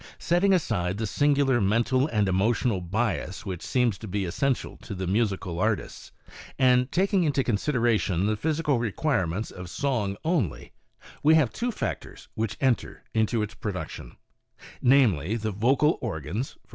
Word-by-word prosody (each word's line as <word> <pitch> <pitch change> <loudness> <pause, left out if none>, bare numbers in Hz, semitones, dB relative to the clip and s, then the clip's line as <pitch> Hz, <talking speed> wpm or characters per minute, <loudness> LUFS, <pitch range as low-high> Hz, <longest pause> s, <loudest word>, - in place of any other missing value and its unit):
Setting 175 +3 +2
aside 100 - 0
the 110 - -2
singular 140 0 +2
mental 115 +7 +2
and 105 -8 +1
emotional 100 +2 +1
bias 95 0 -2
which 95 -4 -5
seems 120 -6 0
to 110 - -8
be 100 0 -2
essential 130 +9 -1
to 100 - -8
the 95 0 -3
musical 95 -3 -1
artists, 105 +1 -2 0.5
and 125 0 +3
taking 190 +1 +2
into 145 -4 +1
consideration 115 - +1
the 110 +1 +1
physical 150 +2 0
requirements 110 - -1
of 90 -1 -9
song 105 -6 -1
only, 110 - -1 0.5
we 155 +2 +5
have 140 -8 +3
two 245 +2 -2
factors - - -5
which 110 -1 -3
enter 130 -6 0
into 110 0 +1
its 105 0 -5
production, 100 -3 -6 0.6
namely, 115 - +3
the 110 -1 -2
vocal 130 - +2
organs 105 - -4
— - - -37
i. - - -36
115 Hz, 150 wpm, -26 LUFS, 100-135 Hz, 0.6 s, we